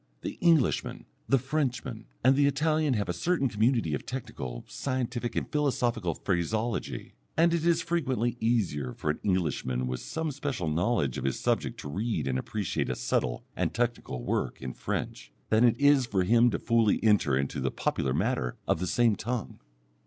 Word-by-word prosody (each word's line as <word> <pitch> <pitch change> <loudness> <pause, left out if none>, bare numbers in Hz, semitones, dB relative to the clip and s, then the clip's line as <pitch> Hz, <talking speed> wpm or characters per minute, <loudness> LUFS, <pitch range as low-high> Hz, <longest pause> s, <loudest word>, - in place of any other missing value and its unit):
The - - -5
Englishman, 165 -7 +2 0.2
the 135 - +5
Frenchman, 130 -4 -2 0.2
and 130 +2 +6
the 140 0 +4
Italian 150 0 +2
have 100 -3 -1
a 90 - -1
certain 150 - +1
community 110 - +1
of 70 - -2
technical, 65 - -6
scientific, 125 -2 -3
and - - -1
philosophical 120 - 0
phraseology, 110 +5 -2 0.2
and 165 +1 +4
it 170 -2 0
is 170 - +3
frequently 130 -8 0
easier 95 - 0
for 75 - 0
an - - -6
Englishman 75 -9 0
with 65 0 -3
some 160 -1 -3
special 135 - -3
knowledge 80 - +1
of - - -5
his 70 -1 -1
subject - - 0
to - - -7
read 105 - -2
and 65 -1 0
appreciate 105 - -2
a - - -1
subtle - - -1
and - - -1
technical 115 - -2
work - - -1
in 65 -1 -5
French, - - -4 0.2
than 110 +2 +4
it 120 +1 +4
is 145 -3 +5
for 95 -5 +1
him 120 +5 +5
to - - -1
fully 115 -3 +2
enter 100 -11 +4
into 70 +1 -2
the - - 0
popular 65 - -1
matter 60 -1 0
of - - +2
the 90 - -2
same 115 +2 +3
tongue. 115 - -4
115 Hz, 175 wpm, -29 LUFS, 80-130 Hz, 0.2 s, and